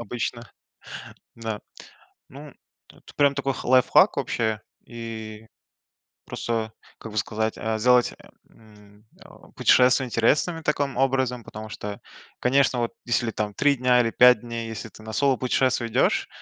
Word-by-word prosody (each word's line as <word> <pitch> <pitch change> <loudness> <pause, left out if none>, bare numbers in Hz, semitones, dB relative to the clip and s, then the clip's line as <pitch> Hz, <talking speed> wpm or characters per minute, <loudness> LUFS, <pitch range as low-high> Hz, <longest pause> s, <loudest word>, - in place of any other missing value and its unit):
обычно. 115 -1 -5 0.9
Да, 110 -2 -5 0.7
ну 145 +1 -12 0.4
это - - -17
прям 140 -1 +3
такой 135 -1 -1
х - - -8
лайфхак 130 0 +4
вообще. 110 -2 -1 0.3
И 110 -2 -8 0.8
просто, 115 -2 -3 0.3
как 110 - -9
бы 110 - -7
сказать, 110 +2 -1
э 110 0 -2
сделать, 125 +1 +3 0.4
м, 105 -1 -20
э, - - -17 0.3
путешествие 130 +1 +4
интересным 150 +8 +1
таким 145 -3 -1
образом. 130 -2 0
Потому 110 +1 -9
что, 105 -1 -7 0.4
конечно, 135 0 +2
вот 120 -1 -2
если 120 -1 0
там 105 -1 -3
3 140 +7 +2
дня 125 -1 +3
или 115 -1 -1
5 125 -3 +6
дней, 115 -1 -6
если 110 0 -7
ты 110 - -16
на 110 0 -8
соло 135 +2 +2
путешествие 130 -2 0
идешь. - - +1
120 Hz, 145 wpm, -24 LUFS, 110-130 Hz, 0.9 s, 5